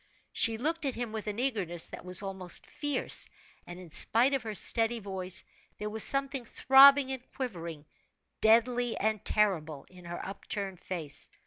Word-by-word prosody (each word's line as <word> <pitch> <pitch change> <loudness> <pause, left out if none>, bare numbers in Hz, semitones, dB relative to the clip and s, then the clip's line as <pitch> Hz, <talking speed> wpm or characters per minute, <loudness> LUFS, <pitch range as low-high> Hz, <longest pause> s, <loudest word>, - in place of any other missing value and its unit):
She 225 -2 0
looked 320 +6 -4
at 270 - -3
him 240 -2 -5
with 215 -1 -7
an 210 0 -5
eagerness 200 -10 -1
that - - -11
was 180 +2 -1
almost 190 -2 -5
fierce; 290 -1 +1 0.4
and 175 +1 -10
in 180 -3 -14
spite 240 - +5
of 270 - -1
her 220 -1 -8
steady 225 +3 +3
voice, 190 -4 -3 0.3
there 210 0 -6
was 220 0 +4
something 275 -1 +4
throbbing 270 +3 +4
and 260 -2 -5
quivering, 170 - -7 0.6
deadly 235 +2 +1
and 215 0 -2
terrible, 160 -9 -2
in 180 -1 -16
her 175 0 -8
upturned 195 -1 -7
face. 160 -6 -5
215 Hz, 160 wpm, -28 LUFS, 185-250 Hz, 0.6 s, spite